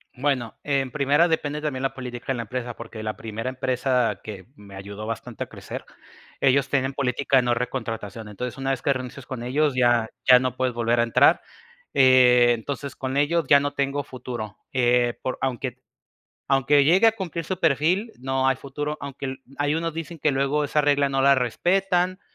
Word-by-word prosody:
Bueno, 130 Hz, -4 st, -1 dB
en 135 Hz, -3 st, 0 dB
primera, 145 Hz, +4 st, +3 dB
depende 150 Hz, -2 st, -1 dB
también 140 Hz, -4 st, -3 dB
la 135 Hz, -, -1 dB
política 125 Hz, -2 st, -8 dB
de -, -, -5 dB
la -, -, -2 dB
empresa, 120 Hz, +1 st, -5 dB
porque 115 Hz, -1 st, -9 dB
la 110 Hz, 0 st, -3 dB
primera 115 Hz, +2 st, -5 dB
empresa 130 Hz, -1 st, 0 dB
que 100 Hz, -3 st, -9 dB
me 100 Hz, -4 st, -13 dB
ayudó 100 Hz, +2 st, -8 dB
bastante 115 Hz, -1 st, -5 dB
a -, -, -10 dB
crecer, -, -, -8 dB, 0.6 s
ellos 135 Hz, 0 st, +3 dB
tienen 135 Hz, -1 st, 0 dB
política 135 Hz, 0 st, +1 dB
de 130 Hz, -, +4 dB
no 120 Hz, 0 st, +2 dB
recontratación. 115 Hz, -3 st, -4 dB
Entonces, 120 Hz, +4 st, -6 dB
una 135 Hz, 0 st, -1 dB
vez 130 Hz, -, -2 dB
que 140 Hz, -, +1 dB
renuncies 130 Hz, 0 st, -5 dB
con 125 Hz, -3 st, -6 dB
ellos, 140 Hz, +3 st, +1 dB
ya 120 Hz, -3 st, +3 dB, 0.2 s
ya 125 Hz, -1 st, +9 dB
no 130 Hz, 0 st, -2 dB
puedes 130 Hz, -1 st, 0 dB
volver 120 Hz, 0 st, +1 dB
a -, -, +5 dB
entrar, 115 Hz, -, +4 dB, 0.5 s
eh, 125 Hz, -2 st, +6 dB
entonces, 140 Hz, +4 st, -6 dB
con 130 Hz, +1 st, -3 dB
ellos 160 Hz, +3 st, +2 dB
ya 140 Hz, 0 st, +7 dB
no 145 Hz, 0 st, -2 dB
tengo 140 Hz, 0 st, -1 dB
futuro, 120 Hz, -5 st, -7 dB, 0.2 s
eh, 120 Hz, -1 st, +2 dB
por 130 Hz, -, -3 dB
aunque 130 Hz, -1 st, -3 dB, 0.7 s
aunque 140 Hz, +1 st, +4 dB
llegue 180 Hz, +9 st, +5 dB
a 225 Hz, -, +6 dB
cumplir 175 Hz, -6 st, -5 dB
su 185 Hz, +2 st, -4 dB
perfil, 170 Hz, -, +2 dB
no 130 Hz, +1 st, 0 dB
hay 135 Hz, -, +2 dB
futuro, 145 Hz, +4 st, -5 dB
aunque 140 Hz, -1 st, -6 dB
l 130 Hz, 0 st, -4 dB, 0.2 s
ahí 145 Hz, +1 st, +1 dB
unos 165 Hz, +1 st, -2 dB
dicen 165 Hz, +1 st, -6 dB
que 150 Hz, -, +2 dB
luego 140 Hz, +2 st, 0 dB
esa 150 Hz, +1 st, +1 dB
regla 145 Hz, -1 st, +2 dB
no 135 Hz, 0 st, 0 dB
la 140 Hz, +1 st, +6 dB
respetan. 180 Hz, -, +1 dB
130 Hz, 195 wpm, -24 LUFS, 120-145 Hz, 0.7 s, ya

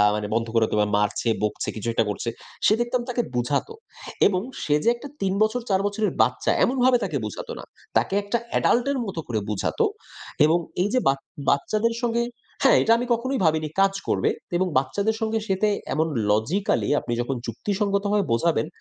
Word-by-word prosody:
মানে 105 Hz, -1 st, -3 dB
বন্ধ 115 Hz, 0 st, 0 dB
করে 115 Hz, -1 st, +4 dB, 0.3 s
মারছে, 105 Hz, +3 st, 0 dB
বকছে, 105 Hz, -, -1 dB
কিছু 110 Hz, +1 st, -5 dB
একটা 115 Hz, -, +2 dB
করছে। 110 Hz, +3 st, -3 dB, 0.4 s
সে 215 Hz, -, +5 dB
দেখতাম 240 Hz, +1 st, 0 dB
তাকে 240 Hz, 0 st, 0 dB
বুঝাত। 125 Hz, -, 0 dB, 0.6 s
এবং 185 Hz, -2 st, 0 dB, 0.2 s
সে 150 Hz, -, +2 dB
যে, 235 Hz, -, +4 dB
একটা 285 Hz, +5 st, -9 dB
৩ 190 Hz, -1 st, +1 dB
বছর, 230 Hz, +3 st, 0 dB
৪ 190 Hz, 0 st, +2 dB
বছরের 205 Hz, -1 st, -1 dB
বাচ্চা, 125 Hz, +3 st, +2 dB
এমনভাবে 255 Hz, 0 st, +3 dB
তাকে 155 Hz, -7 st, -1 dB
বুঝাত 105 Hz, -, -6 dB
না। -, -, -8 dB, 0.3 s
তাকে -, -, 0 dB
একটা 205 Hz, +4 st, 0 dB, 0.2 s
এডাল্ট 240 Hz, +2 st, +3 dB
এর 280 Hz, -, -1 dB
মতো 185 Hz, -4 st, -5 dB
করে 115 Hz, -3 st, -1 dB
বুঝাত। 105 Hz, -, -2 dB, 0.7 s
এবং 165 Hz, +3 st, +3 dB, 0.2 s
এই 200 Hz, -, +1 dB
যে, 255 Hz, -, +4 dB
বা 135 Hz, -, +5 dB, 0.4 s
বাচ্চাদের 215 Hz, +11 st, +1 dB
সঙ্গে 235 Hz, 0 st, +1 dB, 0.4 s
হ্যাঁ, -, -, +6 dB
এটা 225 Hz, -, +2 dB
আমি 245 Hz, -, -2 dB
কখনোই 260 Hz, +3 st, -1 dB
ভাবিনি, 155 Hz, -1 st, +2 dB
কাজ 195 Hz, 0 st, +4 dB
করবে। -, -, +1 dB, 0.3 s
এবং 185 Hz, +1 st, +1 dB
বাচ্চাদের 200 Hz, +12 st, 0 dB
সঙ্গে 220 Hz, 0 st, 0 dB
সে 190 Hz, -, +1 dB
তে 210 Hz, -, +5 dB, 0.2 s
এমন 160 Hz, +1 st, +1 dB, 0.2 s
লজিক্যালি, 150 Hz, -, +1 dB
আপনি 120 Hz, -, -4 dB
যখন 130 Hz, +2 st, -2 dB
যুক্তিসঙ্গতভাবে 200 Hz, -, 0 dB
বোঝাবেন; 155 Hz, +6 st, +1 dB
195 Hz, 180 wpm, -24 LUFS, -, 0.7 s, হ্যাঁ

